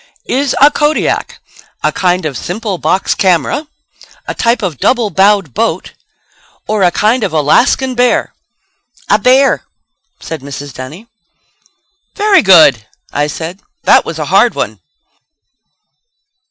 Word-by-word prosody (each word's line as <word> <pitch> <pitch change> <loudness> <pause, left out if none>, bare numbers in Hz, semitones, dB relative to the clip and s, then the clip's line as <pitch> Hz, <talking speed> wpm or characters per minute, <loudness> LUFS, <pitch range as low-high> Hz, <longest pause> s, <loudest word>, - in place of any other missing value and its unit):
Is 275 +1 -1
a 285 +2 +6
Kodiak 295 +1 -1 0.5
a - - +2
kind 180 -2 0
of 145 -3 -3
simple 195 - -4
box 190 - 0
camera; 190 - 0 0.6
a - - -3
type 235 -1 0
of 170 -8 -3
double 235 -5 +1
bowed 195 - +2
boat; - - -2 0.7
or 215 -1 -1
a 180 - +4
type 215 +7 +1
of 200 -6 -2
Alaskan 240 - +2
bear?" 245 0 +1 0.8
"A 210 - +4
bear," 260 +5 +3 0.6
said 160 -4 -7
Mrs. 140 0 -8
Dunny. 145 - -9 1.1
"Very 415 -3 +3
good," 155 - +5 0.3
I 145 +1 0
said. 165 +5 -7 0.2
"That - - +4
was - - -6
a - - -3
hard - - +4
one." - - -4
195 Hz, 125 wpm, -12 LUFS, 160-250 Hz, 1.1 s, a